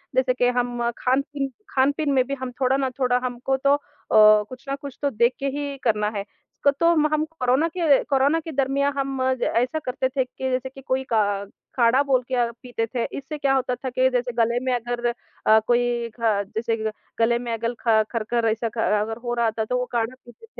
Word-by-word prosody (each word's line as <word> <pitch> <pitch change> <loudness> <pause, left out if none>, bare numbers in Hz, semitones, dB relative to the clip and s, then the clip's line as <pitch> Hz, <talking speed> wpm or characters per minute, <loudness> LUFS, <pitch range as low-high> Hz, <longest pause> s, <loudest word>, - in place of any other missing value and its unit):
जैसे 260 -1 +3
कि 250 -1 +2
हम 245 -1 -1 0.2
खान-पीन 275 +2 0 0.2
खान-पीन 280 +2 +1
में 260 -2 +4
भी 275 - -3
हम 255 -1 -4
थोड़ा 260 +1 +3
ना 265 -1 0
थोड़ा 250 -1 +3
हमको 250 +2 -1
तो 275 +1 +3
अ, - - -5 0.7
कुछ 255 +1 -11
ना 275 - -1
कुछ 280 -1 -9
तो 285 - +2
देख 235 +1 +2
के 275 - -3
ही 285 -1 -4
करना 210 -3 +1
है। 200 - -3 0.5
तो 335 - +2 0.2
हम 305 0 +1
कोरोना 310 -1 +1
के 305 -6 +4
कोरोना 280 +4 +2
के 320 0 -7
दरमियाँ 275 +1 +1
हम 270 -1 -2 0.2
ज - - -1
ऐसा 250 +7 +1
करते 255 +1 0
थे 260 -1 0
कि 260 +1 -5
जैसे 255 +1 -1
कि 270 +1 -13
कोई 260 0 -1
का 220 - +4 0.2
अ, 200 - -7 0.3
काढ़ा 245 +3 +4
बोल 265 -3 +2
के - - +2
य 240 -1 +1
पीते 245 -2 -2
थे। 235 - +1
इससे 280 +2 -6
क्या 275 -2 +1
होता 255 -2 0
था 260 +1 -5
के 255 +1 +2
जैसे 245 0 0
गले 235 +2 +2
में 255 - +1
अगर 240 0 -3 0.4
अ, 220 0 +7
कोई 240 -1 +1
ख 215 -3 +2
जैसे 230 0 0 0.4
गले 235 +1 +3
में 240 -1 -5
अगर 230 +1 -2
ख 220 -1 +5
खर-खर 230 0 0
ऐसा 225 +1 -2
ख 225 - -15 0.2
अगर 225 +1 -3
हो 240 0 -2
रहा 235 -2 +1
था 220 0 -2
तो 250 +3 -1
वो 250 - -1
काढ़ा 235 +1 -1
पीते 240 - -15
250 Hz, 220 wpm, -23 LUFS, 235-275 Hz, 0.7 s, अ